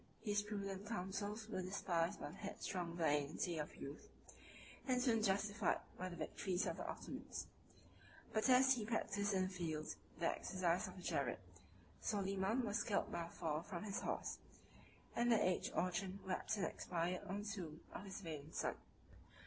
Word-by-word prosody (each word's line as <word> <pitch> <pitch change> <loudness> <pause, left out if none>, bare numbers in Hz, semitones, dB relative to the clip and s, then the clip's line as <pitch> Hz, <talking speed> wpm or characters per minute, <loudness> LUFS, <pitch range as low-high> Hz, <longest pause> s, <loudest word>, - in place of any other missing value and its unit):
His 205 -2 +3
prudent 200 -1 -3
counsels 210 +1 -2
were 210 -4 -1
despised 180 -3 +1
by - - -4
the - - -11
headstrong 180 -4 -3
vanity 155 +1 +2
of 150 - -3
youth, 140 +2 -7 0.8
and 255 -1 +4
soon 235 -3 +4
justified 205 0 +3 0.2
by 185 +1 -3
the 175 - -6
victories 180 +4 0
of - - -1
the - - -3
Ottomans. - - -4 0.9
But 215 +4 +3
as 260 +1 +8
he 240 -4 -1
practised 205 -2 +1
in 185 - +4
the 185 - 0
field 160 -4 -2 0.3
the 170 - +1
exercise 180 -1 +1
of 185 - -8
the 180 - -9
jerid, - - +1 0.6
Soliman 195 +3 +2
was 210 +1 +1
killed 205 - +1
by 170 - -1
a - - -9
fall 155 -2 -1
from 175 +1 -4
his 200 -2 -1
horse; - - -1 0.8
and 240 0 +4
the 225 - +7
aged 185 -1 +2
Orchan 185 +2 +1
wept 190 +3 0
and 200 - +2
expired 175 +1 -1
on 200 +2 -2
the - - -5
tomb 170 -6 -4
of - - -5
his 195 0 -5
valiant 155 -3 -5
son. - - 0
190 Hz, 170 wpm, -41 LUFS, 175-210 Hz, 0.9 s, as